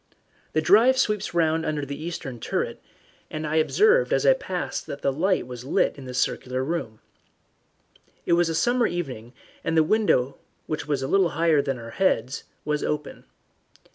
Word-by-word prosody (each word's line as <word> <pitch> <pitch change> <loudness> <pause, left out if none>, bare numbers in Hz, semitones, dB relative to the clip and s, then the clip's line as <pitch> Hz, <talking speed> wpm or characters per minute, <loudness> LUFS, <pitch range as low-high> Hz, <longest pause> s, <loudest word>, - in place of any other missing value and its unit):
The 155 - +1
drive 225 +9 +5
sweeps 210 -7 0
round 160 -1 +2
under 150 -2 -2
the 140 +2 -6
eastern 135 -7 -5
turret, - - -3 0.5
and 155 0 -4
I 155 +1 0
observed 435 - +3
as - - +2
I - - +7
passed - - -4
that - - -7
the 140 - +1
light 185 +4 +1
was 125 -1 -8
lit 135 - +1
in 140 - -10
the 125 0 -7
circular 130 +1 -1
room. 135 -8 -4 1.2
It - - +2
was 170 -1 +3
a 165 - -1
summer 240 +6 +2
evening, 130 -9 -5 0.3
and 165 - 0
the 160 - +6
window, 155 - +1 0.3
which 150 -1 -4
was 140 -3 -1
a - - -2
little 190 +2 +3
higher 160 -2 +2
than 135 -2 -2
our 115 -1 -9
heads, 135 -9 0 0.2
was 150 -1 -1
open. 150 0 -4
155 Hz, 175 wpm, -25 LUFS, 135-175 Hz, 1.2 s, I